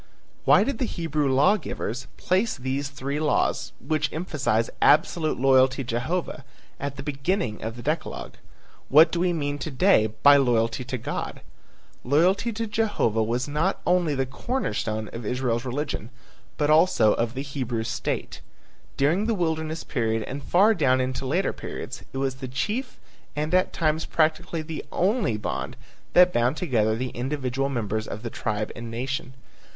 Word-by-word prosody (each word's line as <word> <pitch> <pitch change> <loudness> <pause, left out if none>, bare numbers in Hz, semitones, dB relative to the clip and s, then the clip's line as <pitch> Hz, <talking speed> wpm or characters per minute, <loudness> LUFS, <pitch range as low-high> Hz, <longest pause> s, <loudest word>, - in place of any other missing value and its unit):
Why - - +6
did 275 -5 -3
the 255 - +1
Hebrew 155 - -1
law 145 +11 +4
givers 125 - -5
place 190 +5 +1
these 135 +2 -2
three 140 +1 -4
laws, 155 -1 +1
which 155 -3 -1
emphasize 140 -9 0
absolute 155 -1 +3
loyalty 130 0 +4
to 125 - -11
Jehovah, 150 +6 -2 0.4
at 140 0 -4
the 135 - -7
beginning 140 - -2
of 115 +1 -4
the 120 - -9
decalogue? 155 +3 -3 0.6
What 155 +4 +7
do 170 - -1
we 180 0 +2
mean 145 -3 -2
to 155 - -4
day 140 - +4 0.2
by 145 0 +9
loyalty 120 -2 +1
to 130 0 -3
God? 115 - -5 0.6
Loyalty 180 - +2
to 225 +1 -3
Jehovah 210 - 0
was 120 +4 -1
not 155 +7 0
only 175 -4 +2
the 135 0 0
corner 245 - -3
stone 110 0 -2
of 115 - -6
Israel's 120 +1 -1
religion 130 -3 -3 0.5
but 150 0 +2
also 155 - +5
of 115 +2 -1
the 135 - -3
Hebrew 130 -5 -3
state. - - -3 0.6
During 170 +10 +2
the 230 - +1
wilderness 160 -2 -2
period 115 -4 -1
and 140 +6 -6
far 205 +5 +4
down 130 -9 +2
into 130 +1 -2
later 175 +8 +1
periods - - -7
it - - -6
was 135 -1 -1
the 130 -1 -6
chief 215 - -3 0.4
and 150 +3 -2
at 185 0 +3
times 155 0 0
practically 160 +1 0
the 155 0 -6
only 190 - +1
bond 105 +5 -4 0.4
that 180 0 +6
bound 125 +5 +2
together 110 - +1
the 125 +2 -3
individual 135 +1 -2
members 110 -4 -2
of 105 - -6
the 115 - -4
tribe 105 0 -2
and 115 0 -7
nation. 130 +2 -4
140 Hz, 165 wpm, -25 LUFS, 125-165 Hz, 0.6 s, by